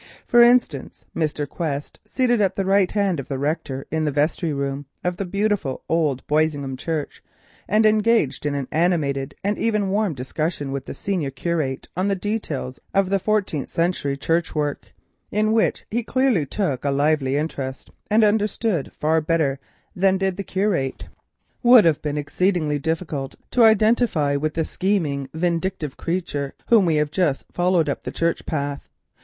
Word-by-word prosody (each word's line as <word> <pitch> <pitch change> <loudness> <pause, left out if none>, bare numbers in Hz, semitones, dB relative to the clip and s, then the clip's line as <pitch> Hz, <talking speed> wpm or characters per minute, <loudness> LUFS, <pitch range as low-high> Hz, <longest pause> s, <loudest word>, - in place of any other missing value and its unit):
For 240 - +5
instance, 240 - +2
Mr. 150 -2 -1
Quest—seated 210 - -1
at 195 - +1
the 195 - -1
right 195 -1 +3
hand 200 -6 +1
of 135 - -6
the 135 - -3
rector 135 -2 -2
in 160 0 0
the 150 - +1
vestry 155 +3 0
room 140 0 -3 0.2
of 180 0 -1
the 195 - -2
beautiful 200 -7 -1
old 150 -6 0
Boisingham 150 -3 0
Church, 150 +2 -4 0.4
and 215 +1 +3
engaged 215 - +2
in 145 - -1
an 140 -2 -3
animated 150 -5 0
and 205 +2 -1
even 210 -3 +1
warm 205 -5 0
discussion 145 +2 -3
with 140 -1 -4
the - - -6
senior 180 -8 -2
curate 145 -2 -2
on 185 +3 0
the 200 - +1
details 180 - -4 0.2
of 195 0 +2
fourteenth 200 -9 0
century 165 -5 -1
Church 165 +4 0
work, 145 -1 -2 0.4
in 215 +1 +1
which 225 0 +1
he 235 +3 0
clearly 240 - +1
took 145 -7 -2
a 145 - +1
lively 140 -1 +1
interest 135 -4 -4 0.2
and 215 +2 +4
understood 210 - +1
far 160 +1 +2
better 155 -4 0 0.4
than 190 +1 +3
did 190 -1 0
the 200 - -4
curate—would 200 - +1
have 160 -3 +3
been 150 -1 -2
exceedingly 155 0 0
difficult 160 -3 -3 0.2
to 245 - +4
identify 220 -9 +3
with 155 +2 -1
the 160 -1 0
scheming, 155 -9 -1
vindictive 170 -3 -1
creature 165 -6 -3
whom 220 -6 +5
we 160 - +2
have 150 -1 +1
just 155 -6 0
followed 175 -3 +2
up 140 - -2
the - - -5
church 170 0 -1
path. 140 -2 -3
165 Hz, 160 wpm, -22 LUFS, 145-200 Hz, 0.4 s, For